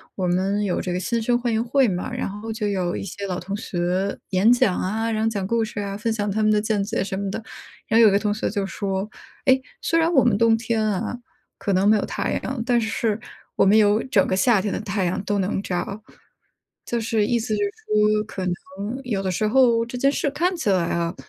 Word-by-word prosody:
我 185 -2 -1
们 195 +3 +1
有 190 -3 -1
这 180 - -3
个 180 - -1
新 230 +5 -1
生 240 +2 +1
欢 240 -2 -1
迎 220 - +1
会 255 +1 +3
嘛， 180 -2 -3
然 - - -3
后 210 +3 -6
就 215 -1 -2
有 185 -3 -1
一 - - -5
些 200 +1 -6
老 180 -1 -3
同 195 +3 -5
学 185 -1 -2
演 195 +4 +4
讲 215 -6 +3
啊， 220 +4 -1
然 220 0 -1
后 225 - +2
讲 200 -4 -3
故 230 +2 +1
事 220 -1 -5
啊， 200 -1 -3
分 225 +2 -2
享 210 -2 -1
他 210 +2 -1
们 215 - +4
的 210 - +3
见 210 -2 0
解 210 -2 -1
什 190 -1 -4
么 200 0 -2
的。 220 - -4 0.5
然 225 +1 +3
后 - - +8
有 205 - +6
个 200 - +4
同 210 -1 0
学 215 - -2
就 200 -2 -2
说， 195 0 -3 0.4
哎， 260 0 +4 0.2
虽 330 - +1
然 330 +1 +2
我 265 - +5
们 240 -5 +3
冬 225 0 +4
天 225 -1 -1
啊， 215 +3 -2 0.4
可 200 - -1
能 190 +2 +3
没 215 - +6
有 205 - 0
太 - - -2
阳， 260 -3 -3
但 240 -2 +2
是 220 -1 -1 0.4
我 - - +4
们 205 +3 +5
有 210 +1 +4
整 210 -7 +3
个 185 - +1
夏 205 +2 +4
天 205 -1 -2
的 - - -2
太 200 -3 -1
阳 185 +3 -1
都 205 0 -1
能 195 +1 -1
照。 195 +3 -4 0.8
就 235 - -1
是 220 -1 +1
意 240 - +2
思 220 -1 -2
就 - - 0
是 405 - 0 0.2
说， 210 0 +2
可 195 -3 -6
能 180 - 0 0.5
有 215 -6 -2
的 190 - -2
时 215 +5 0
候 235 -1 +4
这 240 +1 -8
件 275 +3 +3
事 285 - 0
看 355 +5 0
起 315 - -1
来 180 -3 +2
啊， 170 0 -1
210 Hz, 270 characters per minute, -23 LUFS, 195-230 Hz, 0.8 s, 后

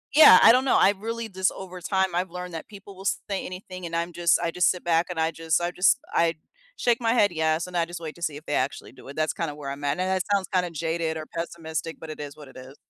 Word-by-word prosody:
yeah, 310 - +10
I 225 - +9
don't 255 +1 +3
know, 265 - +4
I 195 - +6
really 230 +2 -4
just 190 -2 0
over 185 -1 -9
time, 190 0 0
I've 180 0 -1
learned 180 0 -7
that 165 - -6
people 200 -1 -12
will 190 - -11
say 200 -1 -2
anything, 185 0 -8
and 165 - -7
I'm 170 +1 -2
just 170 -1 +3
I 170 -1 -1
just 180 +1 +3
sit 180 - -5
back, 170 0 +2
and 175 -2 -4
I 160 +1 +1
just 160 0 0
I 175 0 -1
just 180 +8 +3
I 165 0 +2 0.4
shake 240 0 +1
my 225 -1 +2
head 205 -6 +4
"Yes," 160 +1 0
and 180 - -9
I 170 - +3
just 175 0 -8
wait 160 -2 -7
to 170 - -16
see 155 -4 -2
if 155 - -13
they - - -3
actually 135 0 -2
do 130 - -15
it, 140 - -9
that's 155 0 0
kinda 165 -3 -3
where 145 -2 -7
I'm 140 +1 -6
at, 140 - +1
and - - +1
that 190 -1 +1
sounds 195 -2 +1
kinda 180 -2 +1
jaded 160 0 -2
or 155 - -6
pessimistic, 165 -1 -5
but 160 - -9
it 155 - -7
is 145 +1 -8
what 150 - -12
it - - -16
is. 130 +2 -11
170 Hz, 290 wpm, -25 LUFS, 160-185 Hz, 0.4 s, yeah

